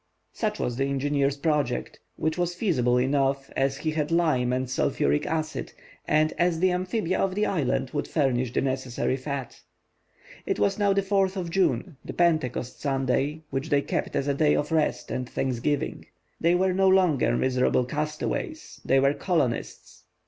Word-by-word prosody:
Such 210 -2 -2
was 120 -1 -2
the 135 - +1
engineer's 140 0 0
project, 145 -4 -1 0.2
which 160 0 -1
was 175 0 -1
feasible 125 - +1
enough, 135 +1 +1
as 135 0 +1
he 155 - -2
had 155 -1 -1
lime 155 -8 +2
and 130 +1 -1
sulphuric 75 - 0
acid, 155 -1 -3 0.3
and 155 +1 +3
as 175 -2 +2
the 185 +1 +3
amphibia 185 +1 -1
of 190 -1 0
the 210 +1 +1
island 135 -6 0
would 145 - -2
furnish 130 -5 0
the - - 0
necessary 130 -1 -1
fat. 135 -1 -5 0.9
It - - 0
was 100 -1 +1
now 200 -1 +3
June 200 - +2
4, 195 -1 +2
and 180 -3 -1
Pentecost 155 -8 0
Sunday, 135 +2 0
which 135 0 -3
they 145 -1 +2
kept - - -2
as 140 - 0
a 140 - +2
day 150 +1 +3
of 150 - -1
rest 160 -2 0
and 125 -1 -3
thanksgiving. 135 +4 -2 0.3
They 170 +2 +3
were 185 +1 +2
no 190 +1 +3
longer 185 -7 +3
miserable 125 -1 +2
castaways, 155 - -4
they 135 - +3
were 140 +1 +3
colonists. 150 -9 -2
145 Hz, 165 wpm, -26 LUFS, 130-175 Hz, 0.9 s, and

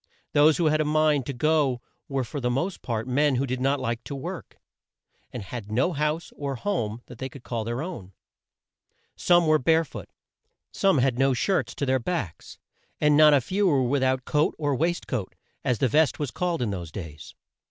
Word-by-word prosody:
Those 150 +1 +5
who 170 - +1
had 155 0 +3
a - - +2
mind 150 -3 +2
to - - -1
go 145 -1 +1 0.3
were 135 -2 -1
for 145 +4 -5
the 125 -2 -1
most 155 +10 -2
part 115 -1 -3
men 140 +2 +2
who 130 +2 0
did 130 -1 -3
not 135 +2 +1
like 115 +1 -3
to 140 - -5
work, 135 - -7 0.7
and 120 - -6
had 105 +1 -7
no 130 +11 +1
house 150 +2 -2
or 140 -2 -4
home 120 - -3
they 130 +2 -7
could 130 -1 -13
call 115 -2 -3
their 120 +5 -3
own. 115 - -8 1.0
Some 175 -1 +4
were 155 -1 +4
bare 160 +4 +3
foot, - - -9 0.6
some 195 -5 +2
had 130 -1 +1
no 135 -1 +3
shirts 180 +11 0
to 140 - -2
their 130 0 +2
backs, 125 - -4 0.4
and 150 -1 +4
not 150 -1 +7
a 140 - +3
few 195 - 0
were 140 -6 +3
with 135 +2 +1
out 130 0 +1
coat 150 0 +1
or 145 -3 0
waist 170 +5 -1
coat, 110 -8 -4 0.3
as 125 - +1
the 130 - +2
vest 150 +4 +2
was 145 -4 -3
called 175 -6 -1
in 110 - -1
those 85 -5 -5
days. 75 -4 -9
135 Hz, 205 wpm, -26 LUFS, 120-155 Hz, 1.0 s, not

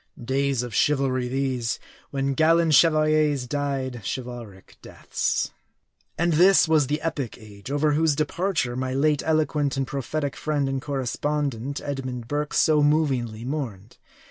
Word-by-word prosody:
Days 135 0 0
of 120 -2 -7
chivalry 130 -1 +1
these, 130 -2 -1 0.3
when 135 0 -1
gallant 160 +2 +3
chevaliers 155 -3 +4
died 135 -2 -3
chivalric 120 -6 -7
deaths! - - -2 0.7
And 170 +1 +1
this 180 +3 +6
was 155 -4 +3
the 150 +2 -1
epic 145 -8 -3
age, 105 -1 -12
over 145 +2 +1
whose 155 0 +2
departure 155 -4 -1
my 130 0 -2
late 150 +1 +2
eloquent 150 -3 0
and 135 - 0
prophetic 140 +2 -3
friend 145 -3 -1
and 135 0 -2
correspondent, 140 -1 -2
Edmund 130 -4 -5
Burke, 145 +2 -2
so 155 -1 +4
movingly 135 -7 +1
mourned. 120 -8 -5
140 Hz, 135 wpm, -24 LUFS, 125-150 Hz, 0.7 s, this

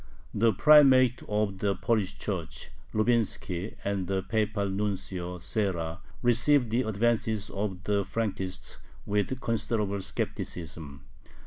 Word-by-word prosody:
The 115 +2 +3
Primate 130 +1 +6
of 105 -2 0
the 100 -1 +1
Polish 100 0 0
Church 85 -5 -5 0.2
Lubinski 110 -4 0
and 100 -2 -1
the 95 -1 -1
Papal 110 -2 0
Nuncio 95 -3 -3
Serra 85 -3 -2 0.2
received 120 +1 +3
the 120 +2 +2
advances 110 -1 0
of 95 -2 -3
the 100 0 +1
Frankists 95 -2 -3 0.3
with 105 +4 -1
considerable 105 -3 -1
skepticism. 75 -5 -5
100 Hz, 110 wpm, -28 LUFS, 95-115 Hz, 0.3 s, Primate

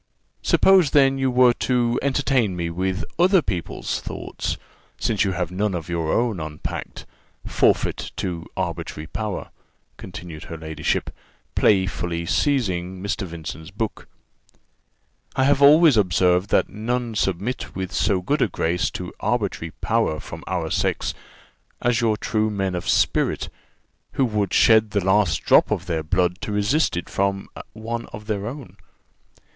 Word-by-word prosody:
Suppose, 190 -6 +5
then, 135 -1 +4
you 135 0 +2
were 125 -1 +5
to 120 -2 +1
entertain 135 -7 +1
me 85 -1 -2
with 95 +4 -2
other 180 -1 +5
people's 90 -4 -3
thoughts, - - -4 0.4
since 105 -3 +1
you 95 -2 0
have 90 -1 -2
none 100 +1 -1
of 85 -1 -5
your 85 -2 -1
own 115 -5 +1
unpacked 75 -1 -6 0.4
Forfeit - - +1
to 85 -3 -4
arbitrary 75 - -4
power," 105 +4 -4 0.5
continued 85 -4 -9
her 80 - -7
ladyship, 80 0 -2 0.4
playfully 90 -4 +1
seizing 95 - 0
Mr. 100 -1 -2
Vincent's 80 -1 -7
book. 105 +2 -4 1.3
"I 130 - +2
have 140 +1 +3
always 150 -1 +7
observed 90 -1 +3
that - - +3
none 120 +2 -3
submit 100 +4 -2
with 95 -1 -4
so 95 -3 +1
good 145 +8 0
a - - +4
grace 85 -1 0
to - - -7
arbitrary 80 - -1
power 110 -9 +1
from - - -9
our 85 -3 -2
sex - - 0 0.7
as 120 0 +1
your 110 -2 +2
true 110 -1 0
men 95 -3 -1
of 90 - -3
spirit, - - +1 0.6
who 135 - +2
would 105 -5 -1
shed 110 -1 +5
the 100 -2 -1
last 95 -4 +2
drop - - +5
of 90 - -1
their 85 -3 -1
blood 90 +3 0
to 105 - -4
resist 105 - +1
it 85 - -4
from 100 0 -1 0.3
one 115 +2 -5
of 105 0 -10
their 105 -1 -2
own. 135 +1 -8
100 Hz, 145 wpm, -23 LUFS, 90-120 Hz, 1.3 s, always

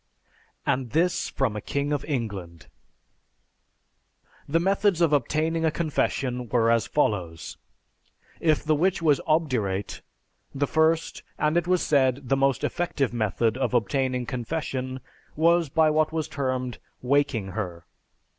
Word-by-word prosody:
And 130 -3 -1
this 175 +3 +1
from 130 -6 -1
a 105 - -4
king 140 +5 -2
of 145 - -1
England! 100 - -4 1.8
The 165 +3 +3
methods 195 0 +2
of 165 -3 +3
obtaining 155 +4 +1
a 160 - +4
confession 135 -6 -1
were 115 -2 +3
as 115 -1 +2
follows: 90 - -1 0.8
If 155 -2 +2
the 155 - +2
witch 175 +3 +1
was 150 -4 +3
obdurate, 125 - 0 0.5
the 140 +1 +1
first, 160 +2 +1 0.2
and 150 +1 +1
it 175 0 +1
was 180 -1 +2
said, 135 -2 +1
the 135 - +4
most 135 -2 +1
effective 140 -8 -1
method 115 +1 0
of 130 - 0
obtaining 125 +2 0
confession 130 0 -4 0.3
was 170 0 +3
by 160 +2 +3
what 155 0 +2
was 160 -1 -2
termed 130 -3 -3 0.2
"waking 130 -6 +1
her." 90 -5 -5
140 Hz, 135 wpm, -25 LUFS, 120-160 Hz, 1.8 s, a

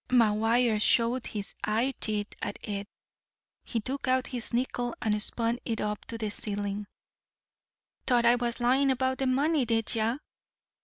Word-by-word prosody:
McGuire 225 -1 +3
showed 235 +3 +2
his 205 -2 -4
eyeteeth 215 -2 -1
at - - -3
it. 200 -1 -4 0.8
He 230 - -2
took 265 +5 -4
out 255 0 +2
his 245 -3 -2
nickel 245 0 -1
and 210 -1 0
spun 230 +2 0
it 225 -2 -2
up 210 0 -3
to 230 - -6
the 215 -2 -3
ceiling. 205 -1 -2 1.2
"T'ought 240 -3 +3
I 235 - +7
was 240 0 0
lyin' 260 +3 +3
about 260 0 +1
the 265 - +1
money, 285 +3 +2
did 225 -2 +1
ye? 230 +2 +1
235 Hz, 150 wpm, -29 LUFS, 215-255 Hz, 1.2 s, I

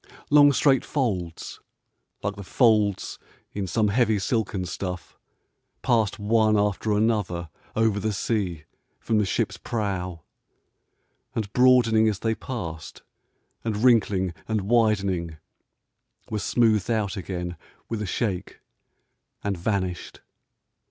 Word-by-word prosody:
Long, 145 -1 +7
straight 135 0 +3
folds, 95 - -3 0.6
like 100 0 -2
the 100 - -8
folds 105 -2 +2 0.3
in 100 -2 -3
some 105 +4 +1
heavy 110 0 +2
silken 100 -2 -1
stuff, 90 0 -5 0.7
passed 115 -5 +2
one 110 0 +3
after 105 +1 0
another 105 -6 0 0.3
over 110 -2 +2
the 110 +1 -1
sea 95 -6 -2 0.4
from 110 -2 +1
the 105 - +2
ship's - - -1
prow, 90 -7 -3 1.1
and 105 -2 -3
broadening 120 -3 +5
as 105 - -2
they 110 +2 0
passed, 80 -11 -7 0.6
and 110 -1 -2
wrinkling 100 -7 +3
and 110 -2 0
widening, 100 -7 +1 0.9
were 110 - -1
smoothed 110 -1 +2
out 110 -4 0
again 90 -2 -4 0.3
with 115 -2 -3
a 105 - -3
shake, 95 -2 -3 0.8
and 100 -1 -1
vanished. 95 0 -3
105 Hz, 115 wpm, -25 LUFS, 95-115 Hz, 1.1 s, Long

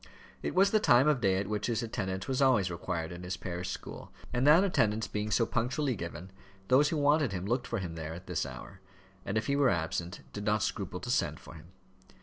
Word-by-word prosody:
It - - -3
was 195 +2 +5
the 215 - +4
time 130 - +5
of 145 -5 +2
day 95 -3 +3
at 100 0 -2
which 105 0 -2
his 115 -1 -1
attendance 95 -5 -3
was 130 +1 0
always 115 -9 +3
required 85 -1 -3
in 90 0 -8
his 90 +1 -4
parish 90 0 -5
school; - - -7 0.2
and 125 +3 +2
that 160 +5 +7
attendance 110 - +1
being 105 0 -3
so 115 +2 +3
punctually 125 +4 -1
given, 90 +1 -7 0.4
those 140 +3 +5
who 160 - -1
wanted 145 -4 +3
him 90 0 -3
looked 120 +3 -1
for 115 - -2
him 90 -4 -4
there 80 0 -6
at 90 +2 -10
this 90 -4 -1
hour, 70 +8 -9 0.5
and 100 - -1
if 110 - 0
he 140 - +1
were 140 -2 +4
absent, 85 +1 -2
did 105 - -5
not 105 +1 +1
scruple 95 -4 -3
to 120 - -3
send - - 0
for - - -12
him. - - -13
105 Hz, 230 wpm, -30 LUFS, 90-130 Hz, 0.5 s, that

